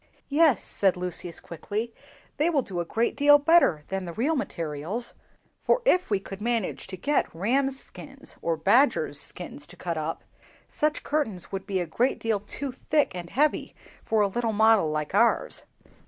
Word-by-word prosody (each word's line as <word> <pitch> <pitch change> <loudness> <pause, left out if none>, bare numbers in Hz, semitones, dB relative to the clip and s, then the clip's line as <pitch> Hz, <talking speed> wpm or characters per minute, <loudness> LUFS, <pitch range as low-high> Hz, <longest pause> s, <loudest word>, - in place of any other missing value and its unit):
"Yes," 295 - +4
said 190 -2 +1
Lucius, 180 -1 -4
quickly, 215 +7 -5 0.4
"they 310 +4 +2
will 290 -6 +1
do 185 -5 -5
a 170 - -1
great 230 +6 0
deal 290 +1 +7
better 290 - +4
than 190 -1 -3
the 170 - -6
real 275 - 0
materials; 170 - -3 0.5
for - - +2
if 365 -7 +3
we 200 -2 +2
could 195 +1 -9
manage 230 -3 -1
to 190 -1 -7
get 290 +10 +1
rams' 265 +9 0
skins - - -7
or 165 -1 0
badgers' 190 - +3
skins 150 -4 -6
to 175 - -15
cut 170 -2 -3
up, 155 +1 -4 0.4
such 305 0 -1
curtains 245 - -2
would 195 0 -5
be 195 -2 0
a 175 - -1
great 240 +11 0
deal 225 -2 0
too 265 +7 -5
thick 295 +1 0
and 175 -1 -6
heavy 295 - 0 0.3
for 220 -1 +1
a 205 - +4
little 230 +2 -1
model 220 -5 +4
like 155 +2 -3
ours. 230 +4 +2
210 Hz, 175 wpm, -26 LUFS, 180-275 Hz, 0.5 s, deal